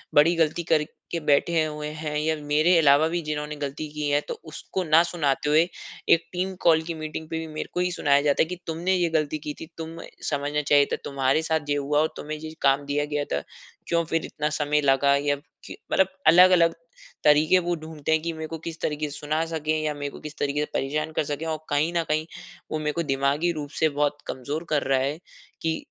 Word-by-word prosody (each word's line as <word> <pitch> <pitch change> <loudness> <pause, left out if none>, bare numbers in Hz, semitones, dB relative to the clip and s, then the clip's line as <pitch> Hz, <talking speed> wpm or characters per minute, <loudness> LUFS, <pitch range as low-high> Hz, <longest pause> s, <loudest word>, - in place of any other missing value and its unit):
बड़ी 160 +4 +6
गलती 165 +1 +1
करके 155 +2 -1
बैठे 160 +3 +3
हुए 150 -1 -5
हैं 150 -1 -3
या 160 +1 +1
मेरे 155 +4 +3
अलावा 150 0 +5
भी 170 +1 -1
जिन्होंने 150 -1 -4
गलती 145 +1 -4
की 150 -1 -2
है, 145 +1 +3
तो - - -6
उसको 165 +4 -5
ना 160 -1 +5
सुनाते 150 -4 0
हुए, 160 +3 +5 0.4
एक 170 - +4
टीम 185 +1 -2
कॉल 160 -1 +5
की 165 +1 -4
मीटिंग 155 0 -6
पे 160 - -2
भी 160 - -5
मेरे 155 - -5
को - - -1
ही 180 0 +1
सुनाया 145 -4 +3
जाता 145 -1 +2
है - - -1
कि, 180 - -3
"तुमने 170 +3 0
ये 175 -2 +1
गलती 155 -1 0
की 150 - -3
थी, - - -6
तुम्हें 165 0 -7 0.2
समझना 145 0 -1
चाहिए 145 -1 +4
था। - - +3
तुम्हारे 135 +2 +1
साथ 160 -2 -1
ये 145 - +2
हुआ 145 +1 +1
और 155 - +1
तुम्हें 155 +1 -5
ये 155 +1 -8
काम 140 +1 +3
दिया 145 +1 0
गया 145 0 +1
था, 70 - -1 0.4
क्यों 170 0 +2
फिर 165 0 -1
इतना 150 0 -2
समय 150 0 +2
लगा? 140 0 +4
या 145 0 +1 0.3
क्य" - - -8 0.2
मतलब 190 - +4 0.2
अलग-अलग 170 0 +7 0.5
तरीके 155 +5 +5
वो 175 0 -1
ढूँढते 160 -1 -5
हैं 160 0 +3
कि 170 0 -3
मेरे 160 0 -6
को 165 - -5
किस 165 -1 -6
तरीके 150 0 -1
से 145 - -8
सुना 155 +2 -1
सकें 155 -1 -2
या 155 -1 -1
मेरे 145 -1 -4
को - - -11
किस 155 0 -9
तरीके 145 +1 -1
से 150 - +1
परेशान 150 +3 -1
कर - - +1
सकें 145 +2 -4
और 160 -1 -1
कहीं 145 +3 +1
न 170 - +1
कहीं, 155 +1 +1 0.5
वो 155 - -1
मेरे 150 0 -1
को 170 - -1
दिमागी 140 +4 +1
रूप 150 -3 -5
से 160 - +4
बहुत 145 0 +1
कमज़ोर 145 +5 -4
कर 150 -2 +1
रहा 135 -1 +2
है 140 +3 -1 0.4
कि 160 -1 0
155 Hz, 230 wpm, -25 LUFS, 145-160 Hz, 0.5 s, अलग-अलग